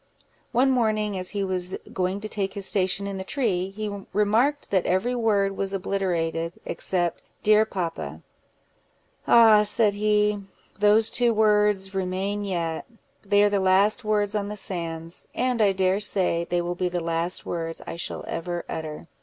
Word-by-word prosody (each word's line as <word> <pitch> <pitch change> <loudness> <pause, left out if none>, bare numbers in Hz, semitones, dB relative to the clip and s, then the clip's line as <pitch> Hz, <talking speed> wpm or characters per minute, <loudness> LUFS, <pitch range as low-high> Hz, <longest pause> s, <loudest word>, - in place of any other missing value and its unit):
One 255 +3 +3
morning, 215 -4 +1
as 185 -1 -2
he 200 -2 -2
was 185 -1 0 0.2
going 185 +2 -1
to 215 - -4
take 195 -2 -2
his 200 -1 -1
station 190 -1 +2
in 200 -1 -4
the - - -4
tree, 190 -6 -1
he 200 0 -5
remarked 225 +8 +1
that 190 -3 +1
every 190 +7 +1
word 205 -5 +1
was 195 0 -2
obliterated, 170 -4 -1
except 175 -3 -1 0.2
"Dear 215 +1 +5
papa."—"Ah!" 190 - 0
said 210 0 +2
he, 210 0 +1 0.4
"those 210 +2 +4
two 240 -2 +3
words 210 -2 +2
remain 195 +2 -2
yet; 170 -5 -3 0.4
they 205 0 +3
are 205 - +4
the 200 -1 +1
last 195 +5 +3
words 210 -1 +1
on 205 -1 -1
the 210 0 -6
sands, 165 -3 -4
and 250 -2 0
I 205 -2 +5
dare 190 0 +1
say 180 -4 0
they 175 0 0
will 175 +1 -2
be 180 0 -2
the 175 0 -2
last 170 +1 -1
words 165 -1 -4
I - - -6
shall 170 - -4
ever 175 +1 -4
utter. 160 0 -6
195 Hz, 160 wpm, -25 LUFS, 180-210 Hz, 0.4 s, Dear